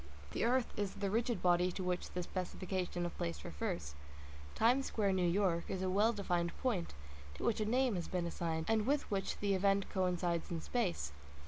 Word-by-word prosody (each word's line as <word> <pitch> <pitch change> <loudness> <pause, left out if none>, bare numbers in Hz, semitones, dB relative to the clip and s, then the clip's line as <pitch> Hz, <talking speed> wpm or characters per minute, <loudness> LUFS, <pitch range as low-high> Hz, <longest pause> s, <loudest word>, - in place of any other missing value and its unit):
The - - -1
earth 250 +1 +2
is 205 -2 -2
the 200 -1 -1
rigid 235 +2 0
body 180 0 +4
to 185 - -3
which 180 0 -1
the 180 - -3
specification 180 -1 -3
of 175 - -4
place 80 -4 -3
refers; 70 +1 -3 0.3
" 70 0 -15
Times 250 +4 +4
Square, 200 -3 +1
New 180 -2 +2
York," 175 -2 +2
is 190 0 -2
a 185 - +1
well 210 +4 +4
defined 175 -5 -1
point, 200 - -1 0.4
to - - -7
which 220 -1 +1
a - - +1
name 250 +2 +2
has 175 -3 -2
been 180 -2 -1
assigned, 165 -1 -2
and 220 0 +2
with 290 +1 +3
which 195 -2 -1
the 200 -1 +1
event 195 +1 +2
coincides 180 -3 0
in 170 - -2
space. 180 - -1
185 Hz, 200 wpm, -36 LUFS, 175-210 Hz, 0.4 s, body